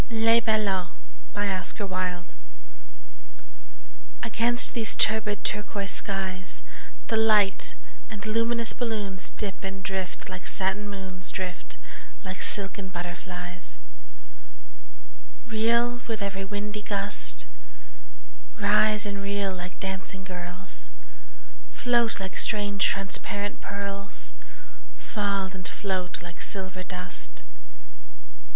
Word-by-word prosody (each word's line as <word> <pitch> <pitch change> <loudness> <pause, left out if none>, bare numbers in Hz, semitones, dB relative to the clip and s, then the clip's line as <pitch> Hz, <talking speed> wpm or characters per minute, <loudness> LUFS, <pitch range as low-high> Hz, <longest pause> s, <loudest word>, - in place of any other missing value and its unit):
LES 225 0 +6
BALLONS 190 -2 0 2.0
AGAINST 235 +1 +3
these 225 -3 +3
turbid 215 -1 +3
turquoise 205 -2 0
skies 190 -2 -1 0.5
The 225 - +3
light 215 -3 +5 0.3
and 215 -2 -5
luminous 230 +1 +3
balloons 210 -5 -1
Dip 200 -2 -4
and 195 0 -3
drift 190 -1 -2
like 185 -1 -5
satin 190 +2 +2
moons 190 -2 -5
Drift 185 -1 -4 0.5
like 190 -1 -4
silken 195 -1 +2
butterflies; 175 +1 -5 1.7
Reel 235 +2 +3
with 220 -3 -1
every 195 -1 -1
windy 210 +1 -2
gust, 205 0 -2 1.1
Rise 210 +1 +5
and 200 -1 -2
reel 200 -1 +1
like 180 0 -6
dancing 190 0 -3
girls, 180 +1 -6 0.9
Float 240 -3 +3
like 190 -1 -3
strange 205 -2 +2
transparent 200 +1 -1
pearls, 200 0 -4 0.7
Fall 200 -3 0
and 185 -2 -6
float 185 -1 -1
like 175 0 -8
silver 190 -3 -1
dust. 180 -1 -6
200 Hz, 90 wpm, -29 LUFS, 190-215 Hz, 2.0 s, LES